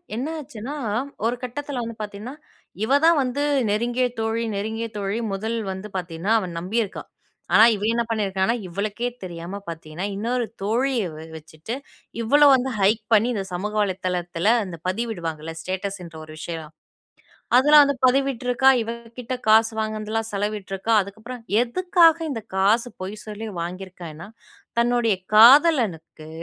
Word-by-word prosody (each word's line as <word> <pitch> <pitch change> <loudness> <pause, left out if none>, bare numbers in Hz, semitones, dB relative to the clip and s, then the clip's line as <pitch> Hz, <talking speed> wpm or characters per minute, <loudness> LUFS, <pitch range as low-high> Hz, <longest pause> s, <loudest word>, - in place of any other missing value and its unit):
என்ன 250 +6 -2
ஆச்சுன்னா, 250 -1 -7 0.5
ஒரு 235 +2 +1
கட்டத்துல 260 +1 -4
வந்து 230 0 -6
பார்த்தீங்கன்னா, 210 +4 -6 0.5
இவ 270 +6 +4
தான் 335 -2 +5
வந்து 270 +2 -1 0.3
நெருங்கிய 240 +4 +1
தோழி, 225 +1 -1
நெருங்கிய 220 +3 -3
தோழி 200 +2 -2
முதல் 220 +4 -2 0.2
வந்து 190 +2 -6
பார்த்தீங்கன்னா, 180 +3 -2
அவ 190 - -4
நம்பியிருக்கா. 200 +4 -2 0.5
ஆனா - - +8
இவ 205 - -6
என்ன 235 - +1
பண்ணியிருக்கான்னா, 200 0 0
இவளுக்கே 205 +6 -3 0.2
தெரியாம 175 +2 -6
பார்த்தீங்கன்னா 165 +2 -6
இன்னொரு 235 +4 -1 0.2
தோழிய 240 +4 +1
வ - - -10 0.2
வச்சுட்டு 160 +6 -8 0.5
இவ்வள 280 +6 +3
வந்து 260 0 +2
ஹைட் 210 +3 +3
பண்ணி 220 +2 +5
இந்த 200 -4 -2
சமூக 205 +4 -3
வலைத்தளத்துல 180 0 0
இந்த 170 -2 -7
பதிவிடுவாங்கல்ல? 170 -7 -3
ஸ்டேட்டஸ்ன்ற 185 -3 -5
ஒரு 155 0 -11
விஷயம், 160 -2 -6 0.9
அதெல்லாம் 295 +3 +8
வந்து 280 -1 -1
பதிவிட்டுருக்கா. 265 -1 +2
இவ 225 - -3 0.3
கிட்ட 250 +1 -3
காசு 225 +1 +6
வாங்குனதுலாம் 215 +1 -2
செலவிட்டுருக்கா. 205 +1 -2
அதுக்கப்புறம் 220 +5 -10 0.2
எதுக்காக 335 +4 +4
இந்த 225 -4 -5
காசு, 215 +5 +3 0.2
பொய் 195 +3 -5
சொல்லி 215 +1 -6
வாங்கியிருக்கான்னா, 175 -1 -7 0.5
தன்னுடைய 235 -3 +2 0.2
காதலனுக்கு 225 - +5
215 Hz, 130 wpm, -23 LUFS, 190-240 Hz, 0.9 s, ஆனா